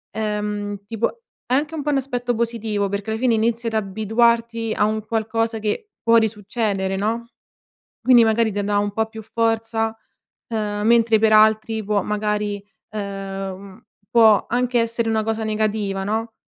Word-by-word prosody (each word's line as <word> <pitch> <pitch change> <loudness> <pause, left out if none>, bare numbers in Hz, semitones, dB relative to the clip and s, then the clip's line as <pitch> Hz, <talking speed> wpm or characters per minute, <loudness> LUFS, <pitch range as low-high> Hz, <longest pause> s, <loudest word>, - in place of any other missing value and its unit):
ehm, 210 -1 -3
tipo, 230 - -2 0.2
è 250 - -2
anche 295 +4 0
un 300 - -4
po' 295 - -1
un 280 - +2
aspetto 245 -2 -2
positivo. 225 -3 -1
Perché 200 +2 -3
alla 220 - -2
fine 250 -1 +2
inizi 230 +1 0
ad 225 - -2
abituarti 225 +2 +1
a 210 - +3
un 215 0 -2
qualcosa 225 0 -1
che 220 - -3
può 230 0 +4
risuccedere, 210 -3 -1
no, 225 +4 -2 0.7
quindi, 245 -2 +6
magari 225 0 +2
te 205 0 -1
dà 205 0 0
un 205 0 -1
po' 220 +1 0
più 220 0 -9
forza. 225 0 -1 0.5
Uhm, 210 -2 -2
mentre 230 -1 +5
per 220 0 +3
altri 220 +1 +4
può 205 0 +1
magari, 210 -1 -1 0.3
uhm, 195 0 -6 0.3
può 220 -3 +5
anche 245 +1 +1
essere 230 0 -1
una 220 -1 +1
cosa 225 0 -2
negativa, 210 -2 -1
no, 220 +3 -2
220 Hz, 160 wpm, -21 LUFS, 210-230 Hz, 0.7 s, quindi